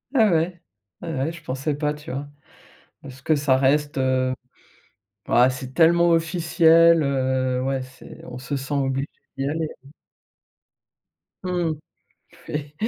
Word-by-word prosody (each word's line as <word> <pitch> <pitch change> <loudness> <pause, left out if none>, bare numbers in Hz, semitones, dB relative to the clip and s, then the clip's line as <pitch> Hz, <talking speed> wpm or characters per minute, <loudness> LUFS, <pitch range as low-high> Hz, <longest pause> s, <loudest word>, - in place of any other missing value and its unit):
Ah 220 -6 +5
ouais, 170 +1 0 0.4
ouais, 165 -2 -5
ouais 135 +4 -1
je 170 - -12
pensais 135 +3 -2
pas, 150 0 -1
tu 150 0 -9
vois? 140 +2 -5 0.8
Est-ce 130 -1 -11
que 155 - +2
ça 140 -2 +2
reste, 145 +3 +1
heu 130 0 +1 0.9
ah, 125 +1 +5
c'est 130 0 -7
tellement 170 +2 +4
officiel, 165 0 +4
heu, 130 -2 0
ouais 135 0 -1
c'est 130 0 -13
on 125 0 -8
se 130 +3 -4
sent 135 +2 -4
obligé 135 +1 -1 0.3
d'y 135 +1 -1
aller. 160 +1 -2 1.8
Mmh, 175 -3 -1 0.8
oui. 150 0 -4
145 Hz, 135 wpm, -23 LUFS, 130-165 Hz, 1.8 s, Ah